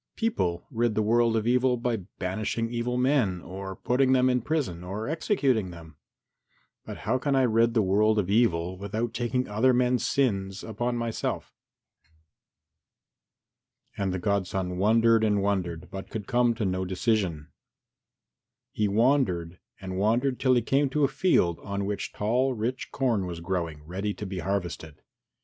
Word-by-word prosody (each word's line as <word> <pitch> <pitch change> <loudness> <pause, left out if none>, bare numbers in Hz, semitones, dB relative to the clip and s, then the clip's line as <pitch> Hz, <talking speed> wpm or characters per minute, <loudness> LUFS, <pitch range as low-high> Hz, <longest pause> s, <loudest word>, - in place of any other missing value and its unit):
People 90 - -1
rid 120 -2 0
the 110 - +2
world 115 +1 +3
of 110 - -1
evil 125 +1 +3
by 120 -1 -1 0.2
banishing 110 +5 -2
evil 120 +1 -1
men 125 -8 +2
or 95 +2 -7
putting 130 +6 +2
them 130 0 +4
in 125 0 +1
prison 120 - -2
or 100 +5 -5
executing 135 - +1
them. 80 -3 -12 0.9
But - - -8
how 125 +5 +1
can 140 +1 0
I 135 - +4
rid 115 0 +3
the 110 - +4
world 105 +3 +3
of 100 -4 +1
evil 95 -4 +1
without 110 +4 -3
taking 125 +1 -1
other 110 +5 +3
men's 125 0 +2
sins 95 -8 0
upon 120 +2 -2
myself?" 115 -1 -3 2.4
And 95 -2 -1
the 95 - -2
godson 95 -1 -1
wondered 115 +2 +4
and 105 -2 +2
wondered, 95 -5 -2
but 95 0 -7
could 105 -3 -5
come 120 +1 +2
to 110 - -2
no 95 0 -1
decision. 95 -5 -1 1.2
He 105 - 0
wandered 100 -7 +1 0.2
and 95 -1 -5
wandered 120 +6 +1
till 130 -1 +3
he 120 - +2
came 135 +3 +2
to 150 +3 0
a - - +5
field 130 - +2
on 100 +4 -4
which 100 0 -3
tall 125 +5 0
rich 120 +4 -3
corn 115 -8 0
was 85 -1 -5
growing, 85 -4 -3
ready 95 +6 -3
to 105 - -6
be 95 -1 -5
harvested. 85 -5 -4
110 Hz, 160 wpm, -27 LUFS, 95-125 Hz, 2.4 s, a